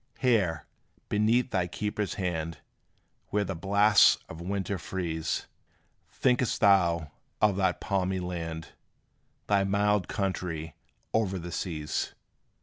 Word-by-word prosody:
Here, 100 - +2 0.4
beneath 115 +5 +2
thy 90 -3 +1
keeper's 105 +2 -3
hand, 85 -4 -2 0.7
Where 105 0 0
the 95 - -3
blasts 100 +4 +5
of 80 - -9
winter 95 +1 -2
freeze, 85 -3 -3 0.6
Think'st 125 -2 +1
thou 85 -6 +4 0.3
of 105 -2 +4
that 95 -2 +1
palmy 95 -1 0
land, 85 -3 -5 0.8
Thy 100 -1 +3
mild 100 -1 +2
country 90 -6 -3 0.4
o'er 100 -4 +1
the 85 0 -6
seas? 80 -3 -3
95 Hz, 110 wpm, -29 LUFS, 85-105 Hz, 0.8 s, blasts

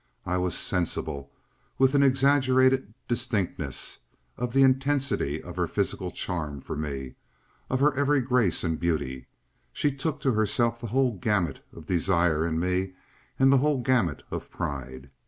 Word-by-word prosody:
I 90 0 0
was 90 -1 0
sensible, 70 -6 -2 0.5
with 135 0 +4
an 140 - +4
exaggerated 130 -3 +3
distinctness, 110 -5 -2 0.4
of 125 0 -3
the 135 +2 +5
intensity 135 - +1
of - - -9
her - - +1
physical - - -2
charm 75 -5 -4
for - - -6
me, 70 -4 -5 0.5
of 130 +1 0
her 145 0 +4
every 145 +1 +2
grace 125 -8 +1
and 80 -2 -1
beauty; 70 -7 -2 0.4
she 145 - 0
took 150 +2 -2
to 135 - +2
herself 115 +1 +1
the 120 - -4
whole 130 +3 +2
gamut 90 -8 0
of 80 - -12
desire 85 -2 +2
in 80 -1 -1
me 90 +2 -1 0.4
and 135 +1 +5
the 135 - +5
whole 145 0 +2
gamut 120 - +1
of - - -5
pride. 65 -1 -6
105 Hz, 155 wpm, -27 LUFS, 80-130 Hz, 0.5 s, the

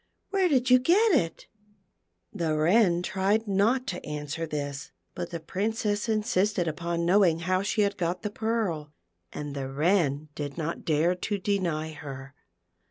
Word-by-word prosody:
Where 385 -2 +2
did 255 -3 +2
you 255 - +8
get 395 - +4
it 170 - 0 0.4
?" 90 +1 -48
The 160 -3 -1
Wren 175 +2 +3
tried 195 +4 0
not 215 +6 +2
to 180 -8 -5
answer 150 +2 -4
this, 145 -2 -4 0.2
but - - -5
the 170 - -5
Princess 205 +5 -2
insisted 210 -4 +1
upon 170 +2 -2
knowing 175 -3 +4
how 185 +2 +1
she 210 +2 0
had 200 0 +1
got 175 +2 -2
the 210 - -2
pearl, 210 -10 -2 0.4
and 145 -1 -6
the 135 -1 -4
Wren 150 0 +1
did 145 0 -5
not 165 0 -4
dare 160 +3 +2
to 200 +3 -3
deny 175 -6 -1
her. 135 -3 -9
175 Hz, 160 wpm, -27 LUFS, 155-210 Hz, 0.4 s, you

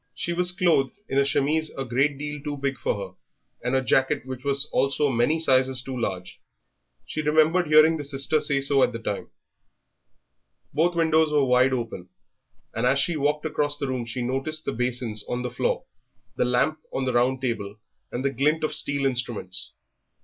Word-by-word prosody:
She 175 - -2
was 180 +1 +2
clothed 170 -7 +2
in 135 - +1
a - - +5
chemise 150 +3 +1
a 135 - -2
great 135 +4 +1
deal 150 0 -5
too 145 0 -4
big 135 -1 -2
for - - 0
her, 100 -3 -7 0.5
and 125 +2 0
a 130 - +2
jacket 130 -1 +1
which 130 -1 -7
was 140 0 +1
also 140 +2 +2
many 120 +6 +2
sizes 130 -4 +3
too 130 0 -6
large. 95 -7 -4 0.6
She 155 - -3
remembered 155 +3 +3
hearing 155 +2 +6
the 150 - -5
sister 140 +2 0
say 145 -2 +1
so 140 0 +2
at 125 - +3
the - - -3
time. 105 -3 -4 1.4
Both 170 +4 +2
windows 160 -2 +3
were 145 -2 +3
wide 125 +1 +4
open, 115 -8 -4 0.6
and - - 0
as 135 - +3
she 165 +4 +1
walked 150 +1 0
across 145 -1 0
the 145 -2 -3
room 125 -3 -3
she 120 +2 -4
noticed 135 +5 -3
the - - -1
basins 120 -3 -1
on 125 0 -2
the 125 - -3
floor, 125 - -1 0.5
the - - +1
lamp 130 +6 +1
on 135 - -2
the 130 - -1
round 125 +2 +2
table, 105 -5 -3 0.3
and 125 +3 -3
the 140 - +2
glint 150 +5 +1
of 155 - 0
steel 140 -1 +1
instruments. 120 -8 -3
135 Hz, 190 wpm, -25 LUFS, 125-150 Hz, 1.4 s, hearing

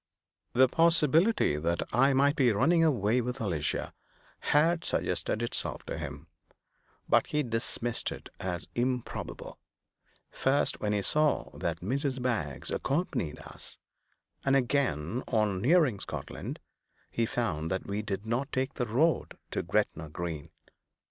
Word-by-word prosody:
The 130 +1 +6
possibility 165 - +3
that 85 +3 0
I 135 +5 +5
might 140 +2 +4
be 125 -4 +4
running 160 +11 +4
away 125 -6 +3
with 125 +2 -4
Alicia 85 - -1 0.5
had 165 +3 +3
suggested 110 - 0
itself 120 - -1
to - - -4
him; - - -6 0.8
but - - +4
he 150 0 0
dismissed 115 0 -2
it - - -8
as 90 -2 -3
improbable, 125 0 -3 0.7
first 140 +2 +1
when 105 - -1
he 100 -1 0
saw 150 +4 +1
that 85 -1 -3
Mrs. 135 - -1
Baggs 110 - -2
accompanied 135 - -1
us, - - -7 0.7
and 135 0 +3
again, 125 - +1
when, - - +1
on 100 -3 +1
nearing 145 - +4
Scotland, - - -6 0.5
he 115 -1 0
found 85 -11 -1
that 95 +1 -2
we 100 +1 -2
did 105 -1 -4
not 120 +5 -1
take 130 +1 -1
the 125 - -2
road 150 +9 +1
to - - -1
Gretna 80 0 -1
Green. 80 -1 -5
120 Hz, 135 wpm, -30 LUFS, 100-140 Hz, 0.8 s, The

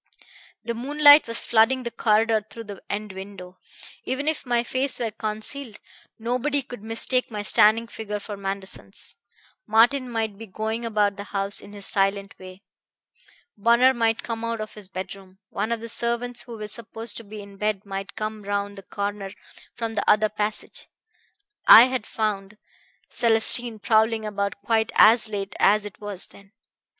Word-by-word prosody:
The 235 - -3
moonlight 290 +4 +6
was 230 0 +2
flooding 240 +3 +3
the 235 - -4
corridor 220 0 +2
through 230 - -8
the 205 -3 -10
end 210 0 -4
window. 190 -1 -10 0.4
Even 260 +4 -3
if 315 -4 -1
my 240 -1 +2
face 260 +3 -1
were 230 -3 -2
concealed, 220 +3 -5 0.4
nobody 255 +5 -1
could 245 -4 -10
mistake 230 +3 0
my 210 -2 -5
standing 220 +2 +5
figure 220 -2 -6
for 205 0 -7
Manderson's. 195 -1 -6 0.5
Martin 245 +4 +3
might 220 -3 -3
be 225 - -9
going 220 +4 -4
about 210 -3 +1
the 200 - -7
house 200 0 -3
in 205 - -13
his 200 -1 -4
silent 195 0 0
way. 185 +1 -12 0.9
Bunner 235 +5 +4
might 225 -2 0
come 230 -1 -5
out 230 -1 -2
of 215 0 -6
his 210 -3 -10
bedroom. 190 0 -8
One 220 - -2
of 230 -1 -2
the 230 - -6
servants 235 +1 -2
who 235 -2 -9
were 210 -1 -6
supposed 225 0 -4
to 230 - -8
be 210 0 -9
in 200 -1 -14
bed 210 -1 -2
might 195 0 -6
come 215 0 -4
round 200 0 -3
the - - -10
corner 200 0 -5 0.4
from 230 -1 -4
the 215 - -1
other 215 0 +4
passage 210 0 -2 0.8
I 225 - +11
had 255 -3 -1
found 210 -2 -3 0.5
Célestine 230 0 +3
prowling 220 +1 +2
about 200 -1 -3
quite 220 0 +1
as 225 +1 +6
late 200 -2 -4
as 210 +1 +4
it 205 +1 -10
was 205 -3 -3
then. 200 +1 -18
215 Hz, 165 wpm, -24 LUFS, 200-235 Hz, 0.9 s, I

